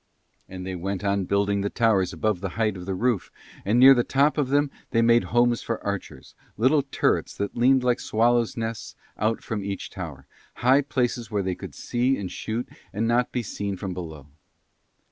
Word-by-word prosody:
And 90 Hz, 0 st, -7 dB
they 95 Hz, -, -4 dB
went 95 Hz, +2 st, -4 dB
on 100 Hz, -1 st, 0 dB
building 100 Hz, +1 st, +1 dB
the 100 Hz, -, -1 dB
towers 100 Hz, -6 st, +2 dB
above 90 Hz, +2 st, -1 dB
the 100 Hz, -, -2 dB
height 110 Hz, -3 st, +1 dB
of 90 Hz, 0 st, -8 dB
the 95 Hz, -, -1 dB
roof 115 Hz, 0 st, 0 dB, 0.3 s
And 105 Hz, +4 st, +1 dB
near 135 Hz, +2 st, +10 dB
the 120 Hz, -2 st, +2 dB
top 140 Hz, +4 st, +2 dB
of 135 Hz, -3 st, 0 dB
them 145 Hz, 0 st, +2 dB, 0.2 s
they 115 Hz, -1 st, +2 dB
made 120 Hz, +1 st, +4 dB
homes 120 Hz, 0 st, +2 dB
for 115 Hz, -, -3 dB
archers, 95 Hz, -9 st, -5 dB, 0.2 s
little 135 Hz, +7 st, +4 dB
turrets 140 Hz, -, -1 dB
that 100 Hz, -, -3 dB
leaned 130 Hz, +2 st, +4 dB
like 125 Hz, -1 st, +2 dB
swallows' 120 Hz, +1 st, +1 dB
nests 115 Hz, -2 st, -4 dB, 0.2 s
out 110 Hz, +2 st, 0 dB
from 105 Hz, -3 st, -3 dB
each 100 Hz, -1 st, -5 dB
tower, 80 Hz, -8 st, -7 dB, 0.3 s
high 130 Hz, +3 st, +4 dB
places 125 Hz, -4 st, -1 dB
where 105 Hz, -2 st, -1 dB
they 95 Hz, 0 st, -1 dB
could -, -, -9 dB
see 125 Hz, +3 st, 0 dB
and 95 Hz, -3 st, -5 dB
shoot 115 Hz, +3 st, -4 dB, 0.2 s
and 110 Hz, +3 st, -1 dB
not 120 Hz, +1 st, +1 dB
be 125 Hz, -, -2 dB
seen 100 Hz, -1 st, -4 dB
from 95 Hz, 0 st, -4 dB
below. 80 Hz, -6 st, -7 dB
110 Hz, 195 wpm, -25 LUFS, 95-120 Hz, 0.3 s, near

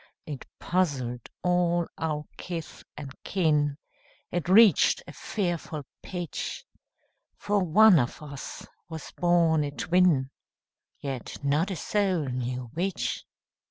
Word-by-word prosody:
It 145 Hz, -6 st, -7 dB
puzzled 135 Hz, -10 st, -1 dB
all 175 Hz, -1 st, +2 dB
our 150 Hz, -2 st, -2 dB
kith 170 Hz, -3 st, -6 dB
and 140 Hz, -3 st, -7 dB
kin, 150 Hz, -6 st, +1 dB, 0.5 s
It 175 Hz, 0 st, -2 dB
reached 210 Hz, +1 st, +6 dB
a -, -, -10 dB
fearful 170 Hz, -7 st, -3 dB, 0.2 s
pitch; 180 Hz, -, -5 dB, 0.7 s
For 205 Hz, -1 st, +1 dB
one 185 Hz, +1 st, +7 dB
of 120 Hz, -1 st, -1 dB
us 140 Hz, -2 st, -8 dB, 0.2 s
was 160 Hz, -2 st, -7 dB
born 170 Hz, -3 st, +3 dB
a 145 Hz, -, -2 dB
twin, 160 Hz, -3 st, +2 dB, 0.7 s
Yet 135 Hz, -4 st, -5 dB
not 150 Hz, +6 st, +2 dB
a 190 Hz, -, -2 dB
soul 185 Hz, -1 st, 0 dB
knew 125 Hz, -1 st, -3 dB
which. 170 Hz, -7 st, -2 dB
160 Hz, 115 wpm, -27 LUFS, 140-180 Hz, 0.7 s, one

